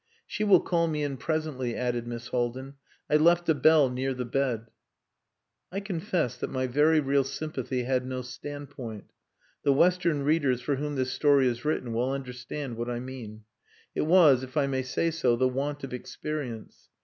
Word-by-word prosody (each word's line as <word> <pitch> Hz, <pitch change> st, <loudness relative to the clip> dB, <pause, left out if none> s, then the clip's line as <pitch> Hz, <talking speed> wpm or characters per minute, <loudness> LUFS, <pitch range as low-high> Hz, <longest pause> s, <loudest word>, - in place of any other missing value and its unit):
"She 215 Hz, -, -3 dB
will 195 Hz, -4 st, +6 dB
call 170 Hz, -2 st, +1 dB
me 150 Hz, -2 st, -1 dB
in 140 Hz, -2 st, -2 dB
presently," 150 Hz, -6 st, -2 dB
added 120 Hz, -1 st, -2 dB
Miss 120 Hz, 0 st, -6 dB
Haldin. 125 Hz, +2 st, -2 dB, 0.3 s
"I 150 Hz, -, +4 dB
left 170 Hz, +2 st, +4 dB
a -, -, +6 dB
bell 150 Hz, 0 st, +5 dB
near 130 Hz, +1 st, -2 dB
the 125 Hz, 0 st, -3 dB
bed." 120 Hz, -3 st, -1 dB, 1.0 s
I 195 Hz, -, -2 dB
confess 180 Hz, -, -2 dB
that -, -, -4 dB
my 130 Hz, 0 st, -1 dB
very 150 Hz, +5 st, +4 dB
real 140 Hz, -1 st, +2 dB
sympathy 135 Hz, -2 st, -3 dB
had 130 Hz, 0 st, 0 dB
no 130 Hz, 0 st, -4 dB
standpoint. 130 Hz, -4 st, -8 dB, 0.5 s
The 140 Hz, -, +3 dB
Western 170 Hz, -1 st, +3 dB
readers 140 Hz, -4 st, +2 dB
for 135 Hz, +2 st, -1 dB
whom 145 Hz, +1 st, -3 dB
this 130 Hz, -1 st, -1 dB
story 145 Hz, -3 st, +4 dB
is 120 Hz, 0 st, -2 dB
written 130 Hz, -6 st, -1 dB
will 120 Hz, +3 st, 0 dB
understand 130 Hz, -1 st, -5 dB
what 120 Hz, +1 st, -3 dB
I 120 Hz, -1 st, -2 dB
mean. 120 Hz, -4 st, -8 dB, 0.5 s
It -, -, -1 dB
was, 160 Hz, -7 st, +6 dB
if 130 Hz, +3 st, -7 dB
I 145 Hz, -, +4 dB
may 135 Hz, -1 st, -1 dB
say 130 Hz, +6 st, -1 dB
so, 130 Hz, -7 st, +2 dB
the 130 Hz, +2 st, +2 dB
want 140 Hz, +3 st, -3 dB
of 135 Hz, -, -6 dB
experience. 125 Hz, -2 st, -6 dB
135 Hz, 180 wpm, -28 LUFS, 125-150 Hz, 1.0 s, will